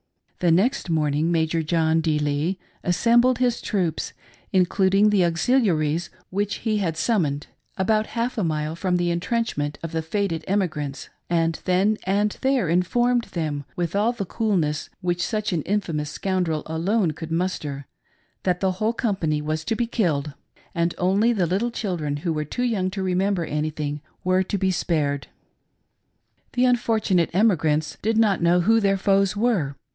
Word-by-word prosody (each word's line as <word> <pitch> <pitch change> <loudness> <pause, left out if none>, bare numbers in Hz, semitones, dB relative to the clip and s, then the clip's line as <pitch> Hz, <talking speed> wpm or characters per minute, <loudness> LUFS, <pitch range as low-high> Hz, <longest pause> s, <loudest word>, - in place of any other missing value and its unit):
The 175 - +2
next 195 +6 +2
morning. 155 0 +1
Major 165 0 +1
John 160 0 +2
D. 155 -2 +1
Lee 150 +5 0 0.3
assembled 235 +7 +3
his 245 -2 +1
troops, 180 -7 -1 0.4
including 190 +2 +3
the 200 -3 +4
auxiliaries 170 - +1 0.2
which 205 +2 -1
he 215 -1 +2
had 165 -5 -1
summoned, 160 -8 0 0.3
about 215 +3 +1
half 235 +2 0
a - - +1
mile 155 -1 -1
from 180 +1 0
the 175 0 0
intrenchment 170 -5 -1
of 165 - -4
the 165 -1 -1
fated 165 -1 -2
emi 195 -1 +2
grants, 145 -3 -6 0.2
and 165 -1 +1
then 195 +4 +2
and 205 +2 0
there 265 -7 +2
informed 240 +8 +2
them, 150 -4 -3
with 175 0 -2
all 210 +4 +3
the 225 -5 -4
cool 215 +1 0
ness 150 -2 -1
which 175 -1 -1
such 215 -2 -1
an 165 - 0
infamous 165 -6 -2
scoundrel 175 -1 -1
alone 170 +4 0
could 160 +1 -8
muster, 155 -5 -2 0.6
that 180 -1 0
the 190 -1 +1
whole 215 +5 -1
company 190 -11 0
was 155 +1 -2
to 225 - 0
be 240 - 0
killed, 155 - -1 0.4
and 170 0 0
only 195 +6 +3
the 195 -7 +1
little 195 +8 0
children 175 -11 -3
who 165 +3 -2
were 155 -1 -1
too 245 - -3
young 205 -7 0
to 190 0 -4
remember 185 -1 0
anything 150 -1 -3 0.2
were 185 +1 +3
to 190 +2 -2
be 190 0 +1
spared. 150 -6 -1 1.3
The 250 +1 +3
unfortunate 220 -8 +2
emigrants 160 -7 +2
did 220 +1 +1
not 210 -5 +3
know 175 +1 +4
who 225 +5 +4
their 195 -2 +2
foes 195 0 +2
were. 200 - +1
180 Hz, 165 wpm, -24 LUFS, 160-210 Hz, 1.3 s, the